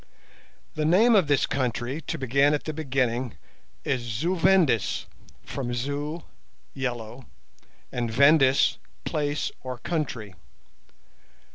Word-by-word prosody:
The 155 - -2
name 195 +10 +5
of 190 -7 +4
this 145 -1 +3
country, 130 +2 -2
to - - -4
begin 140 +3 +3
at 145 - -4
the 155 - -4
beginning, 130 -5 -1 0.5
is 130 - 0
Zu 120 +11 -1
Vendis, 170 - +3 0.4
from 125 -3 -4
Zu, 145 +6 -3 0.5
"yellow", 125 -2 -5 0.6
and 120 -2 -2
Vendis, 135 +2 +4 0.3
"place 145 -2 -1
or 130 -1 -5
country". 120 - -3
135 Hz, 110 wpm, -26 LUFS, 120-155 Hz, 0.6 s, name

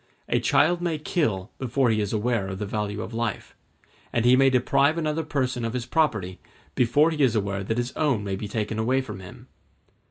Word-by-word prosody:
A - - +1
child 175 +4 +3
may 170 -3 -1
kill 115 - -1
before 130 -1 +1
he 110 -1 +1
is 105 - -2
aware 110 -2 0
of 95 -1 -5
the 105 - -3
value 105 +1 -3
of - - -8
life; 115 0 -3 0.6
and 120 0 0
he 125 +1 +7
may 135 +1 +5
deprive 140 +4 +2
another 155 -1 -1
person 130 -5 -2
of 115 0 -2
his 125 -2 -3
property 110 - 0 0.3
before 145 +7 +3
he 155 -2 -2
is 125 -4 +3
aware 100 -2 -1
that 110 +4 -2
his 120 +1 -2
own 140 -9 +1
may 100 -1 -2
be 105 +2 -5
taken 105 +1 -3
away 130 +4 +2
from 105 -7 -8
him. 95 -1 -12
120 Hz, 210 wpm, -25 LUFS, 105-140 Hz, 0.6 s, he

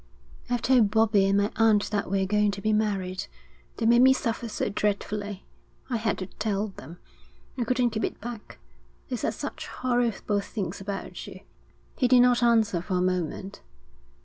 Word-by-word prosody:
'I've 245 -1 -1
told 245 -5 +4
Bobbie 210 -2 +3
and 195 0 +3
my 200 +1 +1
aunt 220 -3 +3
that 205 -3 -1
we're 195 0 +1
going 210 +1 +2
to 200 0 -4
be 215 +1 +1
married. 200 -2 -1 0.5
They 225 - -1
made 235 +1 +6
me 260 +1 +7
suffer 230 -2 -3
so - - -2
dreadfully. 205 -1 -2 0.5
I 240 - +1
had 220 0 -1
to 185 - -4
tell 205 +2 -2
them. 170 -3 -11 0.6
I 245 -3 -2
couldn't 250 0 +1
keep 220 0 -3
it - - -5
back, 235 -1 -8 0.5
they - - -1
said - - -2
such - - -6
horrible 240 -4 0
things 200 -1 -5
about 195 0 -6
you.' - - -10 0.6
He 255 - +3
did 245 0 +6
not 245 -1 +4
answer 225 -7 +3
for 185 +1 -3
a 180 - +1
moment. 185 +1 -2
210 Hz, 175 wpm, -26 LUFS, 195-235 Hz, 0.6 s, me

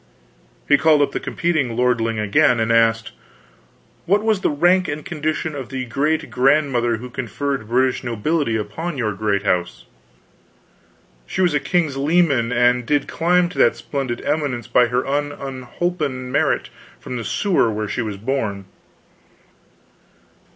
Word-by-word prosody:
He 145 - +5
called 155 -2 +4
up - - -1
the - - -3
competing 155 -9 -1
lordling 115 -2 +1
again, 120 +4 +3
and 115 0 +1
asked: 115 -1 +2 1.0
"What 200 +4 +3
was 220 -3 +1
the - - +1
rank 175 +5 +3
and 145 +1 -5
condition 155 0 -3
of 135 -4 -6
the 130 -1 -4
great 145 +6 -1
grandmother 130 -3 +2
who 125 +3 -8
conferred 130 0 -4
British 130 +2 +1
nobility 125 +2 -1
upon 135 +10 -4
your 110 -4 -1
great 100 0 -1
house?" 90 -11 -1 1.4
"She - - -5
was 175 -4 +3
a 145 - +2
king's 150 -1 0
leman 140 -5 +2
and 125 0 +3
did 145 +3 0
climb 175 +1 +2
to 180 - -8
that 115 - +4
splendid 120 0 -4
eminence 145 -5 -1
by 120 0 +3
her 125 +2 -1
own 145 +1 -1
unholpen 130 0 -4
merit - - +1 0.3
from 125 - -7
the 115 - -4
sewer 180 - +1
where 105 0 -3
she 100 - -2
was 105 -3 -4
born." 110 -4 -3
130 Hz, 150 wpm, -20 LUFS, 115-150 Hz, 1.4 s, He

